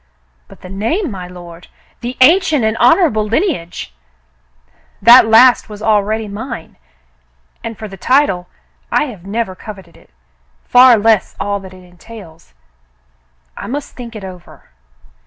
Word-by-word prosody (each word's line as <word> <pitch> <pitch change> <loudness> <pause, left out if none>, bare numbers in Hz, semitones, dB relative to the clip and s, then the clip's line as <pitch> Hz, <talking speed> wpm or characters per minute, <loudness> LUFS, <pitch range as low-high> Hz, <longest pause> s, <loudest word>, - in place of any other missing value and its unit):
"But - - -17
the 185 - -11
name, 230 - -2
my 185 -3 -7
lord, 175 -1 -12 0.2
— - - -36
the 245 +1 -6
ancient 315 - +4
and 220 +1 0
honor 250 +11 +4
able 215 -9 0
lineage! 220 - -3 0.6
" - - -41 0.3
"That 235 +1 +8
last 240 +2 +5
was 210 0 -10
already 215 0 0
mine, 215 -2 -8 0.9
and 225 -2 -6
for 215 - -7
the 195 -1 -11
title 220 -7 +1 0.2
— - - -41
I - - +2
have 210 - -9
never 220 -1 -3
coveted 190 -3 -12
it, - - -22 0.5
far 250 -1 +6
less 220 -1 +1
all 200 0 -2
that 190 -1 -12
it 185 - -16
entails. 180 -2 -15 1.0
I - - -8
must 285 +3 -6
think 235 -2 -9
it 210 - -8
over." 180 - -13
215 Hz, 155 wpm, -15 LUFS, 185-245 Hz, 1.0 s, That